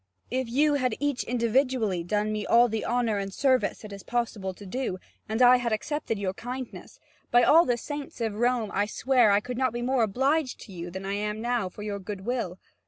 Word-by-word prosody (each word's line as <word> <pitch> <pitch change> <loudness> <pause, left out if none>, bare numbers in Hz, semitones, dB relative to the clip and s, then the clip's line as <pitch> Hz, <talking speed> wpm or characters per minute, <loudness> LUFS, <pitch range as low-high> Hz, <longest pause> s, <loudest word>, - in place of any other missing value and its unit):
If 255 -1 -1
you 290 +5 +3
had 255 -5 +1
each 285 -3 0
individually 235 -5 +1
done 210 +4 0
me 215 -1 -2
all 235 +4 +5
the 220 -1 -3
honour 235 -3 +1
and 195 0 -4
service 260 +2 +1
it 205 - -8
is 200 - -8
possible 220 -5 -2
to 200 +2 -12
do, 220 -1 -3 0.3
and 220 +3 +2
I 250 +1 +8
had 240 -1 -2
accepted 250 +1 -2
your 195 -2 -2
kindness, 250 +3 -7 0.3
by 245 0 +5
all 330 +3 +6
the 245 -1 +1
saints 290 +3 -6
of 225 -2 -1
Rome 240 -3 +1
I 205 +1 +1
swear 250 0 +3
that 200 - +5
I - - +4
could 245 +2 -5
not 255 -3 +1
be 240 0 -3
more 255 0 +1
obliged 265 +6 +1
to 200 - -11
you 175 0 -6
than 190 +2 -7
I 195 - -2
am 210 +1 -2
now 235 -4 -1
for 205 - -9
your 205 -1 -3
good 195 0 -6
will. 225 -5 -3
235 Hz, 225 wpm, -27 LUFS, 205-255 Hz, 0.3 s, I